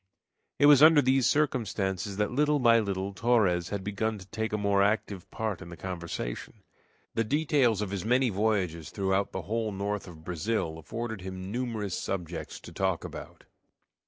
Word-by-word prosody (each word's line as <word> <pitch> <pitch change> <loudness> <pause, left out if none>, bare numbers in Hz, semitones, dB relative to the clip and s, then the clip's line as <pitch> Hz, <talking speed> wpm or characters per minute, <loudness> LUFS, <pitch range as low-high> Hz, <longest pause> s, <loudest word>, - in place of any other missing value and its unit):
It 145 - +4
was 145 -2 +8
under 155 0 +8
these 130 -2 +3
circumstances 100 - 0
that 105 0 0
little 150 +3 +2
by 120 -3 +5
little 100 -2 -2
Torres 100 -6 +2
had 100 -2 -3
begun 105 +2 -2
to 95 - -11
take 110 +3 -3
a 105 - 0
more 100 -1 +2
active 100 -2 0
part 110 -5 -3
in 90 - -9
the 85 - -9
conversation. 85 -8 -5 0.5
The 115 - +1
details 135 -4 +2
of 100 - -5
his 100 -3 -3
many 125 +2 +2
voyages 95 -6 0
throughout 95 0 0
the 95 - -4
whole 110 +1 -2
north 100 +1 -3
of 80 -3 -12
Brazil 85 -1 -2
afforded 110 +5 -5
him 95 +1 -6
numerous 110 -5 -2
subjects 90 -3 -4
to - - -11
talk 95 -3 0
about. - - -9
105 Hz, 170 wpm, -29 LUFS, 95-115 Hz, 0.5 s, was